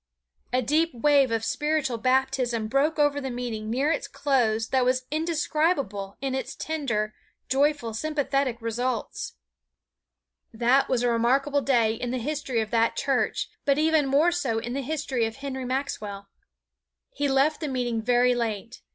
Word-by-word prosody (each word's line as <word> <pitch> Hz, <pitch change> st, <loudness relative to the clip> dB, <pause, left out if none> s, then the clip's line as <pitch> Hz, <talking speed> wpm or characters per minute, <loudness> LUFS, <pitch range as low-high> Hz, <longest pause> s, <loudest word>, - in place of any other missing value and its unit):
A 255 Hz, +1 st, +1 dB
deep 310 Hz, +4 st, +1 dB
wave 280 Hz, +1 st, +4 dB
of 225 Hz, -1 st, -1 dB
spiritual 295 Hz, -5 st, 0 dB
baptism 255 Hz, -2 st, +1 dB
broke 275 Hz, +7 st, +1 dB
over 290 Hz, -1 st, +2 dB
the 265 Hz, -, -3 dB
meeting 240 Hz, -3 st, -4 dB
near 270 Hz, +7 st, +1 dB
its 290 Hz, -, -2 dB
close 225 Hz, -6 st, +1 dB
that 260 Hz, -1 st, +2 dB
was 255 Hz, +1 st, +1 dB
indescribable 300 Hz, -, -1 dB
in 270 Hz, -1 st, -2 dB
its 265 Hz, -, -3 dB
tender, 235 Hz, -10 st, -2 dB, 0.4 s
joyful, 275 Hz, -4 st, +1 dB
sympathetic 275 Hz, -1 st, -1 dB
results. 235 Hz, 0 st, -3 dB, 1.2 s
That 245 Hz, +4 st, +2 dB
was 245 Hz, -2 st, +1 dB
a 245 Hz, -, +3 dB
remarkable 270 Hz, +5 st, +2 dB
day 235 Hz, -5 st, +2 dB
in 240 Hz, +2 st, -4 dB
the 255 Hz, -, -1 dB
history 265 Hz, -2 st, -2 dB
of 215 Hz, 0 st, -5 dB
that 230 Hz, -1 st, +2 dB
church, 270 Hz, -2 st, 0 dB, 0.2 s
but 280 Hz, -1 st, +2 dB
even 310 Hz, -2 st, +3 dB
more 295 Hz, +6 st, +4 dB
so 275 Hz, -11 st, -1 dB
in 240 Hz, +2 st, -3 dB
the 275 Hz, -, -2 dB
history 270 Hz, -4 st, -1 dB
of 225 Hz, -, -7 dB
Henry 270 Hz, -1 st, -5 dB
Maxwell. 210 Hz, -7 st, -4 dB, 0.8 s
He 285 Hz, 0 st, -1 dB
left 275 Hz, +3 st, +2 dB
the 310 Hz, -, -3 dB
meeting 245 Hz, -4 st, -1 dB
very 245 Hz, +2 st, +3 dB
late. 230 Hz, -1 st, -3 dB
260 Hz, 155 wpm, -26 LUFS, 230-285 Hz, 1.2 s, wave